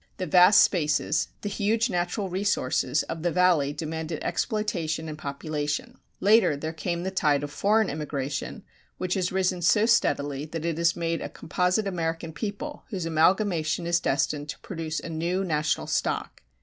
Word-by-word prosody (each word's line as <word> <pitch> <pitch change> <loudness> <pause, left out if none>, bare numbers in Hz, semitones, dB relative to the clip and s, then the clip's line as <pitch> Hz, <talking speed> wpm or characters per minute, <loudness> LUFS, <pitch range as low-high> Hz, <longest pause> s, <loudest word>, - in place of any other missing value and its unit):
The 185 - -2
vast 180 +4 +7
spaces, 155 -2 +1
the - - -4
huge 215 +3 +1
natural 180 0 -1
resources, 180 -7 0
of 165 - -6
the 175 - +1
Valley 175 -5 +3
demanded 160 +1 -4
exploitation 170 -7 -1
and 155 - -5
population. 150 0 -4 0.2
Later 205 -7 +4
there 155 +2 -4
came 170 +1 -3
the 190 - -2
tide 150 -6 +2
of 145 - -5
foreign 210 +8 +2
immigration 145 +4 -4 0.3
which 185 -1 -1
has 185 -2 0
risen 185 -1 0
so 210 +5 +4
steadily 145 - +1
that 160 +1 -5
it 165 -1 -1
has 170 +1 +3
made 165 -1 -2
a - - -4
composite 180 +3 0
American 165 -3 -3
people 215 - -5
whose 185 -6 -3
amalgamation 165 0 +2
is 170 0 +2
destined 145 0 -1
to - - -6
produce 160 -3 -4
a - - -8
new 170 +4 -1
national 150 -4 0
stock. - - -2
170 Hz, 160 wpm, -26 LUFS, 155-190 Hz, 0.3 s, vast